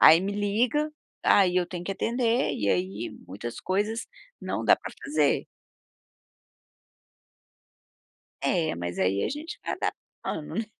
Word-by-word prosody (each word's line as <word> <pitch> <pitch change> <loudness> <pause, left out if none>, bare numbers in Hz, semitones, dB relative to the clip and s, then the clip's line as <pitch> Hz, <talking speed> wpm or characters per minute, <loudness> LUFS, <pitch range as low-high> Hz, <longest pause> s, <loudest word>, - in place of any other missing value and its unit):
Aí 165 +2 +9
me 195 +2 -1
liga. 225 +9 +1 0.4
Aí, 185 -2 +6
eu 180 - +3
tenho 175 0 -5
que - - -3
atender 235 +3 +1
e 100 - -1
aí 95 +5 -1 0.2
muitas 105 +5 -6
coisas 210 +4 0 0.3
não - - -2
dá - - +7
pra - - -8
fazer. 295 +2 +2 3.0
É, 165 -4 +2
mas 85 0 -4
aí 95 +2 +2
a - - 0
gente 305 +4 -6
vai - - -1
adaptando, 150 - -4
né. 225 - 0
190 Hz, 135 wpm, -27 LUFS, -, 3.0 s, Aí